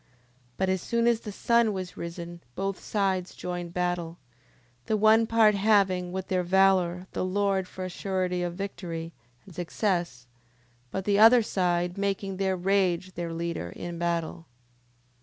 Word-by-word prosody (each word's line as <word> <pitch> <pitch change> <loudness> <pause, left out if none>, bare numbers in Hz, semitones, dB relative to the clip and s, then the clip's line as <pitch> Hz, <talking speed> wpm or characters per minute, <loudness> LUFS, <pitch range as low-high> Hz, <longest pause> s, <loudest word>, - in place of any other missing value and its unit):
10:28. - - -36 0.5
But 190 0 0
as 190 -1 0
soon 235 +3 0
as 235 -1 +3
the 215 - -7
sun 235 +1 +2
was 185 -2 -5
risen 170 0 -7
both 195 0 -2
sides 190 -3 -1
joined 175 -1 -5
battle: 175 -2 -2 0.7
the 215 - +1
one 220 +2 +5
part 225 -2 +5
having, 195 -3 +2
with 190 0 -4
their 185 -1 +1
valour, 185 -1 +3
the - - -2
Lord 195 0 0
for 185 0 -6
a - - -4
surety 185 -1 -2
of 175 -1 -3
victory, 170 -4 -5 0.3
and 190 - -13
success: 175 - -2 0.6
but 190 +6 -4
the 205 -1 +2
other 230 +2 +8
side 180 -2 0
making 195 -1 -2
their 190 -1 0
rage 185 -1 +1
their 170 -1 -4
leader 165 - -3
in 170 -1 -6
battle. 170 -1 -2
185 Hz, 160 wpm, -27 LUFS, 175-200 Hz, 0.7 s, other